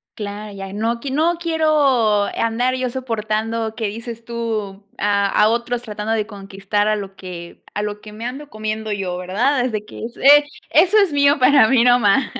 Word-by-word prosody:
Claro, 210 0 -6
ya 195 0 -8
no 230 +3 -1
q 270 +1 -5
no 330 +4 +1
quiero 290 -11 +2
andar 235 +3 0
yo 255 -1 -2
soportando 225 -2 -2
que 220 -2 -2
dices 230 +2 -7
tú 220 -4 -4
a 200 -1 +1
a 210 +2 +4
otros 235 +1 -1
tratando 210 -1 -5
de 215 -2 0
conquistar 200 0 -2
a 215 - +1
lo 195 -1 -7
que 175 -3 -10
a 210 - -2
lo 210 0 -5
que 215 - -11
me 220 +2 -8
ando 275 +4 -6
comiendo 215 0 -4
yo, 190 -3 -3
¿verdad?, 240 +9 0
desde 215 -4 -3
que - - -10
es 235 +1 -7
eh, 290 +2 +7 0.3
eso 405 +4 +5
es 390 -7 +2
mío, 285 0 +3
para 255 -3 +5
mí, 250 -2 +4
nomás. 245 +1 +4
225 Hz, 190 wpm, -20 LUFS, 210-255 Hz, 0.3 s, eh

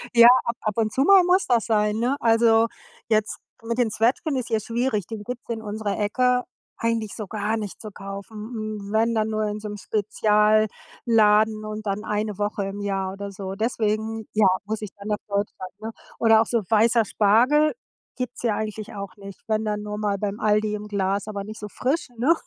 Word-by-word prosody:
Ja, 235 0 +9 0.2
ab 235 - -1
ab 215 0 -2
und 215 -2 +1
zu 265 - +1
mal 385 +1 +7
muss 365 +2 +3
das 235 -3 +2
sein, 210 -1 +1
ne? 250 +4 +1
Also, 225 0 +4 0.4
jetzt 215 -1 0 0.2
mit 235 +1 -2
den 235 -3 +2
Zwetschgen 255 +7 +1
ist 250 - -3
hier 220 -2 +1
schwierig, 230 -3 -1
die 225 - -5
gibt's 245 +1 -7
in 225 -1 -3
unserer 210 -1 -3
Ecke 250 +4 +2 0.4
eigentlich 230 -2 -1
so 215 -4 -6
gar 215 +1 -1
nicht 210 -3 -6
zu 215 -2 -8
kaufen. 215 +3 -6
Wenn, 225 +1 +2
dann 220 0 0
nur 215 0 -1
in 210 0 -3
so 210 - -6
'nem 205 0 -6
Spezialladen 215 +1 +2
und 215 0 -6
dann 200 +1 -2
1 210 -1 -2
Woche 205 -1 -1
im 200 +1 -6
Jahr 195 -1 -2
oder 200 0 -6
so. 190 0 -6
Deswegen, 220 0 -1
ja, 215 -2 +4 0.2
muss 220 +1 -3
ich 210 - -6
dann 200 +1 -7
nach 210 - +1
Deutschland, 200 -2 -3
ne? 225 +1 -5 0.3
Oder 225 -1 +6
auch - - +1
so 235 -2 0
weißer 225 +1 +4
Spargel 245 +11 +3 0.4
gibt's 250 -1 -5
hier 230 -3 +1
eigentlich 215 +1 -5
auch 200 -2 -7
nicht. 200 -1 -11
Wenn 215 0 0
dann 210 0 -2
nur 210 0 -5
mal 205 -1 0
beim 205 +1 -3
Aldi 210 0 +2
im 210 0 -7
Glas, 200 0 -1
aber 205 -2 -4
nicht 215 +1 -8
so 210 - -6
frisch, 275 +11 -1
ne? 265 +9 +4
215 Hz, 200 wpm, -24 LUFS, 210-230 Hz, 0.4 s, Ja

